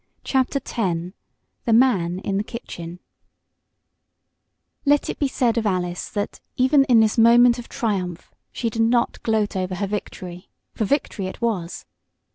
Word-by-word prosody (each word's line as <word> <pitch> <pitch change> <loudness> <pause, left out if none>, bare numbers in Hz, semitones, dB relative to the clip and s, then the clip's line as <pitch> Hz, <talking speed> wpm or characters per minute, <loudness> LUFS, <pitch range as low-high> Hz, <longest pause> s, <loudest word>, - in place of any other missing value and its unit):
CHAPTER 265 +1 +1
X 270 - -7 0.9
THE 230 - +2
MAN 200 -8 +3
IN 195 -1 -2
THE 205 - 0
KITCHEN 175 -7 -8 1.8
Let 290 0 +2
it - - -10
be 285 - +2
said 245 -3 +1
of 220 - -1
Alice 180 -2 -2
that, 205 -1 -4 0.2
even 270 +2 +4
in 235 -4 +5
this 220 +1 +2
moment 240 +1 +6
of 235 - -9
triumph, 195 -9 -3 0.2
she 230 -2 -2
did 225 - -1
not 235 +1 +1
gloat 215 -2 0
over 185 0 -2
her 200 +3 -2
victory 185 -3 -6 0.2
for 220 - -1
victory 215 -6 -1
it 185 - -8
was. 200 -8 -2
220 Hz, 150 wpm, -22 LUFS, 185-245 Hz, 1.8 s, moment